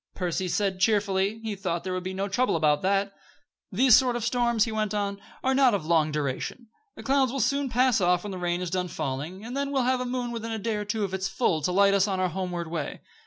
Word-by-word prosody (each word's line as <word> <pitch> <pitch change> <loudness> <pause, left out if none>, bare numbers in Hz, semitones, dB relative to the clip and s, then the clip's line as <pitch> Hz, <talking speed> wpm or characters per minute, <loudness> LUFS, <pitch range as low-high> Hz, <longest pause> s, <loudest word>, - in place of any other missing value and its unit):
Percy 180 0 -2
said, 190 +1 -1
cheerfully, 200 +1 +1
he 220 -2 -3
thought 180 -3 -3
there 185 0 -3
would 185 - -2
be 185 +1 -4
no 195 +1 -2
trouble 245 +3 +1
about 150 -2 +2
that. 195 +1 +1 0.6
"These 245 +4 +6
sort 255 -2 +3
of 240 - -3
storms," 235 -2 +2
he 225 - -2
went 215 -1 -1
on, 200 -1 -2 0.2
"are 265 - +2
not 260 -4 +4
of 180 -6 -3
long 160 -2 +2
duration. 150 - -3 0.3
The - - -10
clouds 270 -2 +2
will 275 - -3
soon 275 +3 +1
pass 250 -2 +3
off 180 0 +2
when 205 - -5
the 185 - -5
rain 175 0 -1
is 180 -2 -4
done 180 -1 -1
falling, 155 +7 -5
and 245 +3 -6
then 280 0 -1
we'll 270 -2 +1
have 255 0 +1
a - - -2
moon 245 -1 -3
within 230 -1 -5
a 225 - -2
day 220 +1 -2
or 210 - -4
two 210 +1 -2
of 190 -2 -3
its 190 0 -1
full 170 -4 0
to 165 - 0
light 200 +2 +4
us 200 0 +3
on 190 -2 -1
our 185 -1 +1
homeward 175 -2 -4
way. 160 -3 -4
200 Hz, 260 wpm, -26 LUFS, 180-235 Hz, 0.6 s, These